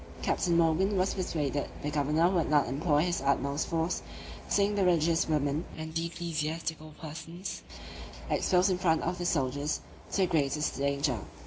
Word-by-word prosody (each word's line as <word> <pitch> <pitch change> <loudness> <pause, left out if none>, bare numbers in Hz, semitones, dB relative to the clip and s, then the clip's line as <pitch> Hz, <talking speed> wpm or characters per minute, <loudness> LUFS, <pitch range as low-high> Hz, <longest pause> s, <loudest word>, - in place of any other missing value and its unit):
Captain 170 -2 +2
Morgan 170 +5 +3
was 185 +1 +2
persuaded 150 -6 -2
the 145 - -1
governor 150 +3 +2
would 180 -3 +1
not 150 -2 +4
employ 145 +3 +2
his 175 -4 0
utmost 140 +1 0
force, 165 +2 -1 0.5
seeing 200 +1 +3
the 200 -1 +1
religious 165 -2 +3
women, 150 0 +1
and 160 0 -6
ecclesiastical 160 -2 -3
persons, 165 +4 -7 0.7
exposed 185 +1 +3
in 180 - +1
the - - -12
front 160 -3 +2
of 175 +1 -2
the 175 - -1
soldiers 145 -1 0 0.3
to - - -1
the - - +5
greatest 150 -3 0
danger. 140 -3 0
160 Hz, 155 wpm, -30 LUFS, 145-175 Hz, 0.7 s, the